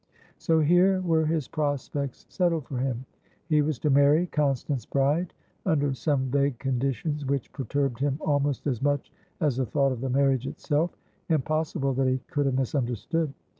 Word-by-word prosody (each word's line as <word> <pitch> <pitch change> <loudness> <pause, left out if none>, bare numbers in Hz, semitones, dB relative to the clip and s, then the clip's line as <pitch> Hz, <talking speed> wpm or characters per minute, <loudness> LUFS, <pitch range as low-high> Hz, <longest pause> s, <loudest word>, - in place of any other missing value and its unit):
So 160 -1 +2
here 180 +5 +4
were 160 -3 +2
his 155 -4 0
prospects 145 -3 -3
settled 170 -5 0
for 130 - -4
him! 130 -1 -2 0.4
He 155 -1 +3
was 150 -2 0
to 150 +3 0
marry 145 +5 +5
Constance 140 - -1
Brideunder 145 - -1
some 140 -1 0
vague 140 -2 +1
conditions 135 +3 -1
which 140 -2 -2
perturbed 135 -2 -1
him 140 0 0
almost 145 -3 0
as 125 -6 -1
much 145 -1 0 0.3
as 145 -6 +1
the 130 - +1
thought 140 +1 +2
of 125 -2 -4
the 135 - -2
marriage 135 -1 +2
itself. 155 +5 -1 0.3
Impossible 155 -2 0
that 130 0 +1
he 130 0 +2
could 145 -1 +1
have 130 -1 +1
misunderstood. 135 - -1
140 Hz, 160 wpm, -27 LUFS, 135-155 Hz, 0.4 s, marry